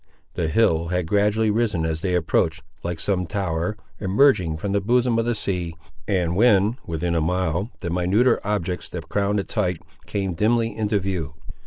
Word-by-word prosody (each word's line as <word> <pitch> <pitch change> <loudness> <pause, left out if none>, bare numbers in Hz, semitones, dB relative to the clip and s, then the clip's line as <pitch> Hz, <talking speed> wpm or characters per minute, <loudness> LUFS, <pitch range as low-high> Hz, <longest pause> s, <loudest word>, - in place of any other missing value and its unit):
The 85 -3 -1
hill 85 -3 +2
had 90 0 -1
gradually 105 +4 +2
risen 105 -7 0
as 80 0 -2
they 90 -1 0
approached, 80 -1 +1 0.2
like 85 -1 -4
some 90 -1 0
tower 95 +1 -2 0.2
emerging 95 - +3
from 100 +5 -3
the 100 0 +1
bosom 120 +2 +2
of 115 - 0
the 120 -1 0
sea, 90 -5 -3 0.3
and 90 -4 +1
when 105 +1 +4
within 85 +1 -1
a 85 - +1
mile, 90 +4 0
the 85 - -3
minuter 95 +8 +3
objects 95 -4 -2
that 80 -3 -7
crowned 100 0 +1
its 100 - -5
height 90 -6 0 0.3
came 95 -3 -2
dimly 115 +4 +1
into 105 -1 0
view. 90 -7 -3
95 Hz, 175 wpm, -23 LUFS, 85-105 Hz, 0.3 s, when